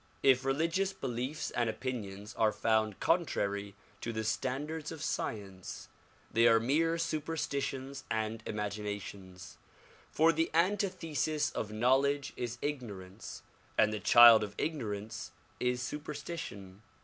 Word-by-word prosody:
If 130 -1 +5
religious 165 +8 +1
beliefs 130 -1 -3
and 120 -2 0
opinions 105 -4 -5
are 110 -2 +3
found 110 -2 +1
contrary 100 - 0 0.3
to 115 - -3
the 110 -1 -2
standards 145 +7 -2
of 160 -2 -6
science 100 -9 -4 0.4
they 115 +1 +6
are 115 -1 +6
mere 160 +8 +2
superstitions 140 -4 -2
and 110 0 -1
imagin 105 0 -3
ations; 95 -2 -10 0.5
for 160 +2 +4
the 165 +1 +1
antithesis 170 - +1
of 105 - -4
knowledge 135 +5 +2
is 120 0 -4
ignorance, 105 -9 -5 0.3
and 110 0 +4
the 105 - -2
child 115 +4 +9
of 105 -1 -6
ignorance 110 -8 -3 0.3
is 125 0 0
superstition. 145 - -6
125 Hz, 120 wpm, -32 LUFS, 105-150 Hz, 0.5 s, child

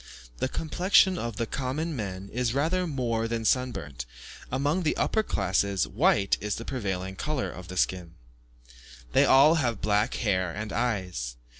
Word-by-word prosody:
The 130 - 0
complexion 180 +5 +3
of 115 -2 -4
the 115 - -1
common 140 +7 -3
men 100 -4 -5
is 125 0 0
rather 175 +6 +1
more 120 -6 -1
than 115 -1 -3
sunburnt; 75 - -1 0.4
among 145 +7 +1
the 155 - 0
upper 220 - +2
classes, 100 - 0
white 100 -1 +2
is 105 0 -2
the 115 - -7
prevailing 95 -7 -3
colour 150 +4 -2
of 90 -1 -10
the 95 +1 -7
skin. 90 -2 -1 1.0
They - - +5
all 140 +4 +7
have 120 -5 -1
black 105 +4 +1
hair 95 -6 0
and 105 +3 -5
eyes. 90 - -2
115 Hz, 155 wpm, -27 LUFS, 95-135 Hz, 1.0 s, all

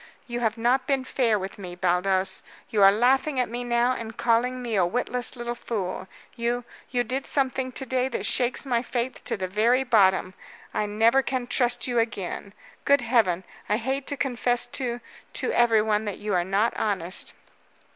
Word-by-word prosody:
"You 240 -2 -4
have 225 -1 0
not 250 +3 +1
been 270 -2 +1
fair 240 -4 +1
with 195 +1 -6
me, 180 -2 -7
Baldos. 185 +1 +1 0.3
You 210 - +2
are 195 0 +9
laughing 260 +6 +2
at 250 - +2
me 240 +2 -4
now 240 +1 +2
and 225 -2 -7
calling 245 +2 +1
me 240 -2 -4
a 190 - +4
witless 245 +7 -1
little 240 0 -4
fool. 195 -6 -4 0.3
You 240 0 -1 0.3
you 245 -1 +1
did 260 +4 -3
something 265 -2 0
to 265 - -4
day 255 0 0
that 265 - -3
shakes 250 +2 0
my 240 -3 +1
faith 245 0 -3
to - - -1
the 190 -1 -3
very 230 +7 +2
bottom. 190 -6 +3 0.4
I 210 - 0
never 225 +5 +4
can 260 -2 -2
trust 245 0 0
you 245 -2 +1
again. 200 -3 -3 0.3
Good 280 -1 +4
heaven, 220 -7 +2 0.3
I 210 - +3
hate 265 +4 -2
to 285 - -1
confess 245 -2 +1 0.2
to 245 -1 -2 0.3
to - - -1
everyone 220 -2 +3
that 205 -3 -3
you 210 -1 -3
are 175 -1 +2
not 200 +5 +1
honest." 185 -4 -2
235 Hz, 185 wpm, -26 LUFS, 210-250 Hz, 0.4 s, are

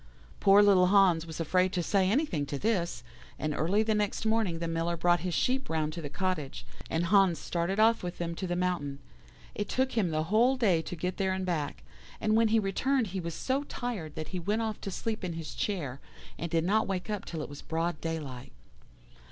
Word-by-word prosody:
"Poor 200 +1 +7
little 190 -3 +6
Hans 180 -4 +4
was 160 0 -7
afraid 185 +3 +2
to 175 - 0
say 190 +1 +2
anything 200 - 0
to 145 - -3
this, 170 - -1 0.3
and 155 -1 -2
early 190 +9 +2
the 220 0 +1
next 210 +1 -1
morning 220 -6 +1
the 170 0 -3
Miller 165 +1 -1
brought 175 +1 +3
his 180 0 -2
sheep 265 +1 0
round 155 -1 -1
to 170 - -5
the 145 - -5
cottage, 170 -4 -3 0.2
and 165 +2 0
Hans 190 -2 +4
started 175 +4 -2
off 225 +1 +5
with 180 0 -5
them 170 -1 -3
to 185 +3 -4
the 175 - -1
mountain. 175 -6 -1 0.6
It 205 - -4
took 260 +1 +1
him 210 -6 +1
the 155 -1 0
whole 230 +9 +3
day 190 -10 +3
to 175 - -6
get 180 +2 -3
there 190 -1 +1
and 190 0 -2
back; 155 -5 -2 0.4
and 215 0 +2
when 225 0 +5
he 220 +1 +3
returned 230 +6 +1
he 190 - -1
was 170 -2 -4
so 265 +2 0
tired 215 - -5
that 155 0 -5
he 185 - -3
went 210 +6 0
off 220 -2 -3
to - - -4
sleep 220 +3 -3
in 180 -2 -2
his 165 -1 -6
chair, 145 -11 -3 0.4
and 170 - -4
did 165 -1 +1
not 215 +5 +2
wake 190 +1 -3
up 205 -2 -3
till 160 -3 -5
it - - -7
was 145 - -9
broad 165 0 -2
daylight. 150 -7 -5
180 Hz, 220 wpm, -30 LUFS, 165-210 Hz, 0.6 s, Poor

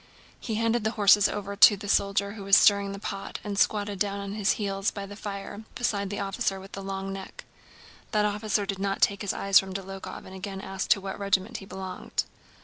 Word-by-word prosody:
He 220 - -3
handed 230 +1 +1
the 220 - +2
horses 205 0 +6
over 200 0 -4
to 205 0 +8
the 205 +1 -8
soldier 200 0 +2
who 205 -1 -8
was 195 0 +6
stirring 200 -1 +5
the 200 - -6
pot 195 0 -5
and 205 -1 -3
squatted 205 -2 +1
down 200 0 0
on 200 0 -5
his 210 -1 +2
heels 195 -1 -1
by 200 -1 -6
the 205 +1 -9
fire 200 0 -6
beside 205 -5 -1
the 205 - -4
officer 195 0 -1
with 195 +1 -12
the 195 - -6
long 195 0 -4
neck. 195 -1 -8 0.7
That 210 -1 +2
officer 210 0 0
did 195 -1 -3
not 195 0 0
take 200 - +2
his 205 - -1
eyes 195 -1 +4
from 190 -1 -5
Dólokhov 195 0 -7
and 190 - -11
again 190 0 -6
asked 195 0 -4
to 195 - +4
what 195 +1 -6
regiment 200 +3 0
he 195 - -10
belonged. 190 -1 -4
200 Hz, 220 wpm, -27 LUFS, 195-205 Hz, 0.7 s, to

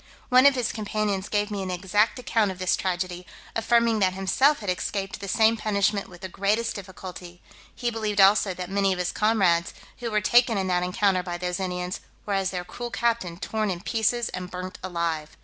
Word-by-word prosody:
One 255 +2 +7
of 280 - +4
his 250 -3 0
companions 210 -2 -2
gave 210 0 0
me 200 -1 -3
an 190 - -4
exact 195 +6 +1
account 225 -4 +1
of 190 - -5
this 185 -1 +1
tragedy, 180 -1 -3 0.3
affirming 230 0 +3
that 185 -2 +2
himself 230 +10 +2
had 205 - -4
escaped 195 +2 -3
the 200 - -6
same 220 +3 +3
punishment 205 -1 0
with 175 -1 -14
the 190 - -4
greatest 210 +5 0
difficulty; 185 -2 -9 0.4
he 240 -1 -2
believed 215 -2 -2
also 195 -1 +5
that 180 0 -5
many 195 0 +1
of - - -5
his 180 0 -1
comrades, 195 -7 +2 0.2
who 240 - -3
were 215 -1 +2
taken 235 +3 +4
in 190 - 0
that 180 -1 +1
encounter 185 +1 +1
by 175 -1 -5
those 180 0 -3
Indians, 180 -1 -3 0.3
were, 205 - -2
as 195 -1 +1
their 180 -2 -4
cruel 240 +7 -6
captain, 230 -8 -1
torn 215 +3 -2
in 180 -2 -2
pieces 235 +2 0
and 180 -1 -6
burnt 185 0 -7
alive. 170 -4 -3
195 Hz, 200 wpm, -25 LUFS, 180-220 Hz, 0.4 s, One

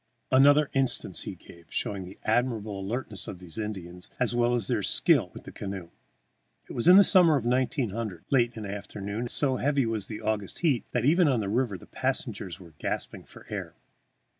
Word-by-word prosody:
Another 145 +2 +5
instance 135 -2 +1
he - - -6
gave, 85 -1 -16
showing 95 -2 -3
the 90 - -11
admirable 110 -3 0
alertness 105 +1 -4
of 95 - -6
these 90 +2 -8
Indians, 90 -5 -6
as 125 -2 +1
well 120 0 +2
as 120 - 0
their - - 0
skill - - +3
with - - -11
the - - -10
canoe. 95 -4 -6 0.8
It - - -8
was 120 - 0
in 180 - +10
the 200 - +9
summer 180 -6 +6
of 130 -5 -1
1900, 115 - -1
late 120 -4 +4
of 115 - -17
an 110 - -5
afternoon, 100 +1 -5
and 120 0 -2
so 130 -1 +1
heavy 140 -1 +1
was 110 -3 -2
the 110 -1 -6
August 105 -2 -2
heat 145 -9 +2
that 125 -1 0
even 170 +4 +5
on 130 -5 +2
the 100 -2 -2
river 115 -2 0
the - - -14
passengers 90 - -3
were 85 -4 -14
gasping - - -4
for - - -15
air. - - -5
115 Hz, 200 wpm, -28 LUFS, 100-130 Hz, 0.8 s, in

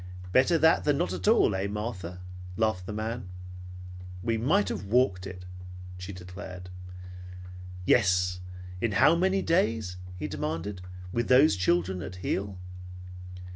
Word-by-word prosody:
"Better 130 - +4
that 160 +1 +4
than 145 -2 +2
not 175 - 0
at - - -4
all, 220 - +5
eh, 95 +1 -1
Martha?" 100 -4 -5 0.4
laughed 110 -5 0
the - - -4
man. 110 -1 -4 0.9
"We 115 0 +1
might 155 - +2
have - - -4
walked 100 -4 +2
it," 90 -1 -9 0.5
she 90 +2 -6
declared. 90 0 -9 1.1
"Yes. 90 -4 +3 0.4
In 115 -3 0
how 155 - +6
many 190 +3 +2
days," 115 - +1 0.2
he 90 - -4
demanded, 85 +5 -4 0.3
"with 120 +4 -1
those 130 -1 +6
children 90 0 +1
at 95 -1 -6
heel?" 95 +1 -3
100 Hz, 135 wpm, -28 LUFS, 90-125 Hz, 1.1 s, how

